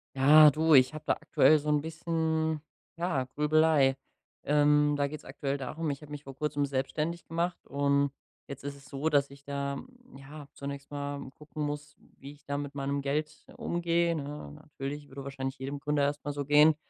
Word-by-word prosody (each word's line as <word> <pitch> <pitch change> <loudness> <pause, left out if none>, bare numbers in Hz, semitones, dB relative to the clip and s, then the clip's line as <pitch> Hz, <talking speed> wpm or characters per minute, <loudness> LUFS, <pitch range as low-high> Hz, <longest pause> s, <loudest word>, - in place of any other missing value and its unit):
Ja, 150 +3 +8
du, 160 +2 +3
ich 130 +1 +6
hab 155 - -8
da - - +3
aktuell 155 -1 +4
so 150 +1 -4
'n 150 -1 +3
bisschen, 160 -1 -1 0.4
ja, 165 -7 0
Grübelei, 150 -2 +4 0.5
ähm, 150 0 +4
da 145 0 +1
geht's 155 +1 -8
aktuell 140 +1 -3
darum: 150 +5 -4
Ich 140 0 -4
hab 150 - -12
mich 145 -1 -7
vor 135 -2 -10
Kurzem 145 0 -1
selbstständig 150 +5 -2
gemacht 170 +2 -2
und 140 0 +2 0.4
jetzt 140 0 -8
ist 140 0 -5
es 140 -1 -16
so, 140 +4 -2
dass 140 -2 +3
ich 140 0 -15
da, 140 0 -3 0.4
ja, 140 +2 -10
zunächst 140 0 -7
mal 145 -1 -5
gucken 150 +1 -7
muss, 145 0 -4 0.2
wie 140 +1 -10
ich 145 0 -18
da 140 0 -2
mit 145 0 -5
meinem 140 0 -1
Geld 150 +2 -3
umgehe, 170 0 +1
ne? 150 0 -6
Natürlich 145 -1 -7
würde 135 +1 -8
wahrscheinlich 135 -1 -4
jedem 140 +2 -4
Gründer 150 0 0
erst 145 +1 -1
mal 145 - -2
so 145 0 -4
gehen, 150 +2 +6
145 Hz, 190 wpm, -30 LUFS, 140-155 Hz, 0.5 s, Ja